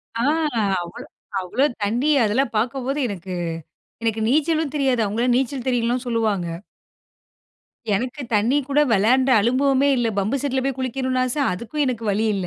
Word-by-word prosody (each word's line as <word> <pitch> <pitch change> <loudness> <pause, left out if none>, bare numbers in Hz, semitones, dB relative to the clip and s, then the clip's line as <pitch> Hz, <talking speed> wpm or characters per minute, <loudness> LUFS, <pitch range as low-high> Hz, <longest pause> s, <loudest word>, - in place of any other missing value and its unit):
ஆ. 235 +3 +1 0.6
அவ்வளோ, 170 0 -9 0.3
அவ்வளோ 190 +10 0 0.2
தண்ணி 240 +9 +1
அதெல்லாம் 230 +5 +1
பார்க்கும்போது, 260 +5 -1
எனக்கு 190 -3 -6 0.7
எனக்கு 225 -1 0
நீச்சலும் 310 +2 +1
தெரியாது. 265 -4 +1
அவங்கல்லாம் 240 +4 +1
நீச்சல் 265 0 -2
தெரியும்ல்லாம் 245 +1 0
சொல்லுவாங்க. 220 -6 0 1.5
எனக்கு 250 +8 -2
தண்ணீ 230 +7 +3
கூட 280 +1 +3
விளையாண்ட 250 +6 +3
அனுபவமே 265 +4 +2
இல்ல. 240 -2 +1
பம்பு 210 +7 0
செட்ல 265 -2 0
போய் 270 -2 -2
குளிக்கணுனு 260 0 -1
ஆச. 255 - -2 0.2
அதுக்கும் 245 +10 -2
எனக்கு 235 -3 -2
வழி 215 +3 0
இல்ல 185 -2 -3
245 Hz, 140 wpm, -22 LUFS, 220-270 Hz, 1.5 s, தண்ணீ